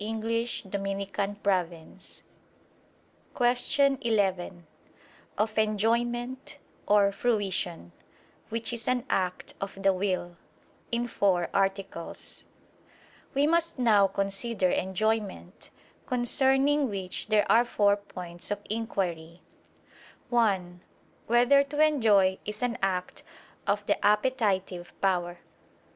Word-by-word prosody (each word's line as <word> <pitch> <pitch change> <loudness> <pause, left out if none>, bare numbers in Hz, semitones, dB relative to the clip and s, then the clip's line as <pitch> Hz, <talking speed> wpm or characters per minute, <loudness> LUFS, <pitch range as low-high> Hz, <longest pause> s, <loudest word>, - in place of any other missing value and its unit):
________________________ 200 -5 -3 1.1
QUESTION 260 +3 +2
11 190 -6 -1 0.7
OF 215 +1 -1
ENJOYMENT 240 +6 -1 0.3
[*Or, 205 -1 +4
Fruition], 195 - -1 0.6
WHICH 230 +1 -3
IS 230 -1 -3
AN 250 0 0
ACT 180 -1 -1
OF 195 0 -6
THE 195 0 +4
WILL 185 -2 -2 0.5
(In 240 +1 0
Four 185 -6 +1
Articles) 195 -3 -2 0.9
We 280 +1 +3
must 335 +1 +1
now 215 -5 +4
consider 195 +1 -1
enjoyment: 200 0 -2 0.4
concerning 270 +3 +2
which 190 -1 -4
there 215 -1 +3
are 235 - +6
four 205 -4 +2
points 180 -4 -8
of 205 - -2
inquiry: 180 -7 -3 0.9
(1) 190 -7 +1 0.5
Whether 245 +4 +5
to 290 +1 -6
enjoy 220 -11 +4
is 210 +2 -6
an 240 -1 -1
act 185 -2 -2 0.5
of 205 0 0
the - - 0
appetitive 205 -5 0
power? 175 -2 0
205 Hz, 95 wpm, -28 LUFS, 190-240 Hz, 1.1 s, are